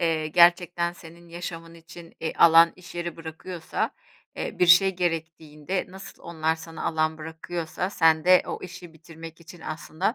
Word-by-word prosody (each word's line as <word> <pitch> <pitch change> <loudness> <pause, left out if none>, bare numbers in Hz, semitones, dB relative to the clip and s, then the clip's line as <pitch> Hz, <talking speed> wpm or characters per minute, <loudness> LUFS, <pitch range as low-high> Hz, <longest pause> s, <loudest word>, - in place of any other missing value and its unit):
eee, 160 -2 0
gerçekten 175 +1 +3
senin 170 0 -15
yaşamın 165 -1 -8
için, 170 0 -14
eee, 160 - -3
alan 165 0 +7
iş 180 -1 -13
yeri 175 -1 -5
bırakıyorsa, 165 +1 -5 0.5
eee, - - -5
bir 180 - +4
şey 185 +2 +6
gerektiğinde 165 0 -3
nasıl 195 +1 -12
onlar 160 -1 -1
sana 160 0 -9
alan 160 0 0
bırakıyorsa 160 +3 -5
sen 160 -4 +3
de 185 0 +6
o - - -4
işi 175 -1 -10
bitirmek 165 0 -12
için 170 +1 -14
aslında 160 +7 -3
165 Hz, 155 wpm, -25 LUFS, 160-175 Hz, 0.5 s, alan